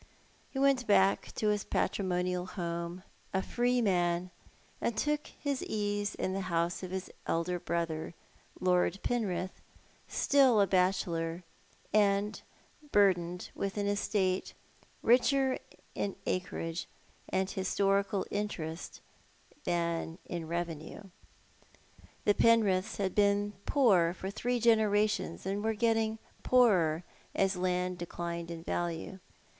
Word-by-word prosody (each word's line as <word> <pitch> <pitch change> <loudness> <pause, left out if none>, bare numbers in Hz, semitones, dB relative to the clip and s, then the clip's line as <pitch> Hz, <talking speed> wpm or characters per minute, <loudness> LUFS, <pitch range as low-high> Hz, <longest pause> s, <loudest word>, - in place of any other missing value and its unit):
He - - -8
went 270 -3 +3
back 195 -1 +3
to 215 - +1
his 210 -1 +1
patrimonial 180 -1 -1
home 170 -1 -4 0.3
a 190 - +1
free 245 0 +1
man, 175 -2 +1 0.5
and 235 - -1
took 295 +4 0
his 280 -2 -3
ease 205 -1 -1
in 185 - -2
the 195 - -2
house 170 -2 -1
of 185 - -5
his 190 0 -5 0.2
elder 175 +2 0
brother, 165 -1 -2 0.4
Lord 180 0 +2
Penrith, 190 -6 -2 0.5
still 265 -6 +4
a 200 - +6
bachelor, 180 -3 0 0.5
and 205 0 +2 0.5
burdened 180 -3 +2
with 195 +1 -3
an 205 - 0
estate 200 -2 0 0.5
richer 260 +2 +4 0.3
in 200 - -2
acreage 170 -2 -2 0.4
and 190 0 0
historical 195 +1 +1
interest 175 -6 -4 0.6
than 170 -1 -1
in 170 -3 -5
revenue. 170 +1 -4 1.2
The 205 - +5
Penriths 215 -3 +3
had 195 -2 -1
been 205 0 +2
poor 185 -11 +4
for 190 +1 -5
three 245 +4 -1
generations^ 215 -5 +2
and 200 +2 -2
were 220 0 0
getting 225 0 +1 0.2
poorer 180 -10 +4 0.3
as 195 0 +2
land 180 0 -1
declined 170 0 -4
in 165 -1 -6
value. 175 +2 -3
190 Hz, 115 wpm, -31 LUFS, 175-210 Hz, 1.2 s, a